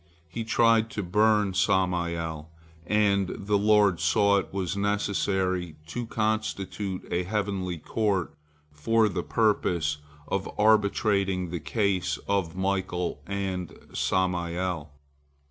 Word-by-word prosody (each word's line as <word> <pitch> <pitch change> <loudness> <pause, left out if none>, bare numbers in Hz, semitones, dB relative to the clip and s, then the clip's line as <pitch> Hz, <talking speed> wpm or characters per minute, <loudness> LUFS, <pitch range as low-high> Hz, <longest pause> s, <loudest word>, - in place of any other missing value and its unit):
He 115 +8 -5
tried 115 0 +3
to 105 - 0
burn 105 +2 +3
Samael, 85 -4 0 0.4
and 100 -2 +2
the 100 +1 0
Lord 105 -4 +4
saw 100 +5 +3
it - - -7
was 95 -1 -2
necessary 95 -4 0
to 120 +7 -4
constitute 105 -3 -2
a 85 - +1
heavenly 95 -2 -2
court 100 +2 -1 0.4
for 110 +9 +2
the 95 -3 -2
purpose 85 -9 +1 0.3
of 100 0 -2
arbitrating 100 -4 +2
the 85 - -3
case 95 +5 0
of 95 -4 0
Michael 95 -2 -2
and 95 -3 -3 0.2
Samael. 90 -3 -1
95 Hz, 110 wpm, -27 LUFS, 90-105 Hz, 0.4 s, Lord